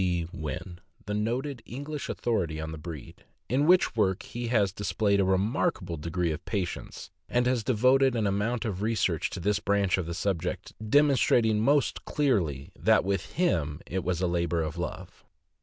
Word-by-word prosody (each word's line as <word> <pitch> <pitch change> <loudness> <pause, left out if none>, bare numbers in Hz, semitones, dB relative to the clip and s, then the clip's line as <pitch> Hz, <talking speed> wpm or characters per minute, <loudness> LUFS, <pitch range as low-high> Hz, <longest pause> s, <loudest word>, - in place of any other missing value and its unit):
B. 90 -2 0
Wynn, 85 +2 -6 0.3
the 105 - -3
noted 120 +5 -2
English 145 +4 -6
authority 90 -10 -1
on 80 0 -4
the 80 - -7
breed, 75 -4 -9 0.2
in 140 +5 +2
which 180 -7 +4
work 95 -4 +1
he 120 0 -5
has 105 -5 +2
displayed 100 +1 +1
a - - +4
remarkable 95 - 0
degree 85 +2 -1
of 80 +1 -5
patience, 95 -6 -4 0.2
and 125 0 +2
has 125 -2 +1
devoted 130 +3 +3
an 110 -2 +1
amount 105 +5 0
of 100 -4 -3
research 105 -6 0
to - - -6
this 105 +3 +1
branch 100 -2 +1
of 85 - -3
the 85 - -4
subject 90 -2 -2
demonstrating, 120 -3 +4
most 140 +4 +2
clearly, 85 - 0
that - - +3
with 95 -2 -2
him 80 - 0
it 95 0 -3
was 90 -1 -1
a 90 - +2
labor 85 -1 0
of 80 +1 -4
lov 90 +1 -6
e. - - -37
100 Hz, 175 wpm, -28 LUFS, 85-120 Hz, 0.3 s, which